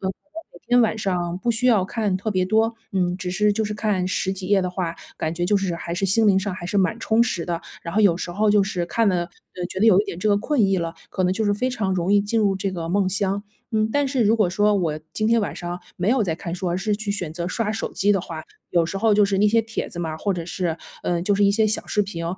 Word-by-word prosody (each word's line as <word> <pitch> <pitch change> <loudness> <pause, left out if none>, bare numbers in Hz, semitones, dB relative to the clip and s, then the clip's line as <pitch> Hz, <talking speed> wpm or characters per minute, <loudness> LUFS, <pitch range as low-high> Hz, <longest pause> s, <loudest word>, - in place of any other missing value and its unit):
呃， 190 - -2 0.4
每 175 - -15
天 245 0 +5
晚 220 -1 +1
上 180 -3 -1
不 235 +5 0
需 235 +2 0
要 225 -6 +5
看 210 -1 -1
特 210 +3 -3
别 185 -2 +1
多， 220 +4 +2 0.2
嗯， 180 -2 0
只 180 -1 -4
是 210 +3 +2
就 220 +1 -1
是 210 - -3
看 205 -4 0
10 190 0 -1
几 190 -1 -6
页 205 -1 +4
的 180 - -1
话， 180 -2 -3 0.2
感 160 +1 -2
觉 175 +1 -1
就 205 - +3
是 190 -3 -1
还 170 0 -5
是 190 +3 -1
心 220 +3 +3
灵 195 -2 +5
上 195 -1 -3
还 175 -1 -7
是 200 - -2
蛮 205 +5 +1
充 225 +1 +3
实 185 -8 -2
的。 170 -1 -2 0.2
然 170 0 -6
后 215 - +3
有 200 -5 +5
时 175 - -5
候 210 +3 +2
就 205 -1 +5
是 185 -3 -2
看 225 +3 +2
了， 180 -2 +1
呃， 180 0 -10
觉 190 - -4
得 225 - +5
有 195 -4 +7
一 - - -1
点 170 - -6
这 215 - 0
个 205 - +4
困 270 +6 0
意 195 0 +2
了， 165 0 -3 0.2
可 185 - -1
能 180 - +2
就 220 +3 -1
是 205 - +2
非 250 +5 -1
常 200 -6 -1
容 185 +2 0
易 205 - +5
进 210 +3 0
入 200 -2 +2
这 195 0 -2
个 170 -2 -4
梦 195 -1 +2
乡。 200 +1 -1 0.3
嗯， 215 0 +2
但 285 -1 +2
是 260 -3 +1
如 220 +3 +4
果 210 -5 +3
说， 205 +3 +3
我 160 -5 -1
今 215 - -1
天 230 0 +4
晚 205 - -3
上 175 0 -5 0.2
没 180 +3 -1
有 255 -1 +3
在 170 -6 -1
看 170 -3 -5
书， 180 0 -3
而 175 - 0
是 205 +1 0
去 215 -1 -4
选 180 -6 -4
择 170 +1 -3
刷 215 +2 -1
手 220 - -4
机 205 +1 +2
的 195 - +1
话， 165 -3 -7 0.3
有 170 -2 +2
时 195 - -4
候 220 0 +3
就 210 0 +5
是 195 -1 0
那 210 +1 +4
些 230 +2 +4
帖 225 0 -4
子 175 - -9
嘛， 160 -2 -3
或 200 +5 -1
者 170 -1 -5
是， 170 -2 -2 0.3
呃， 175 -1 0
就 200 +2 +2
是 205 - +3
一 200 - +5
些 215 +2 +2
小 215 - -1
视 210 - 0
频， 170 -4 -5
195 Hz, 315 characters per minute, -23 LUFS, 180-215 Hz, 0.4 s, 有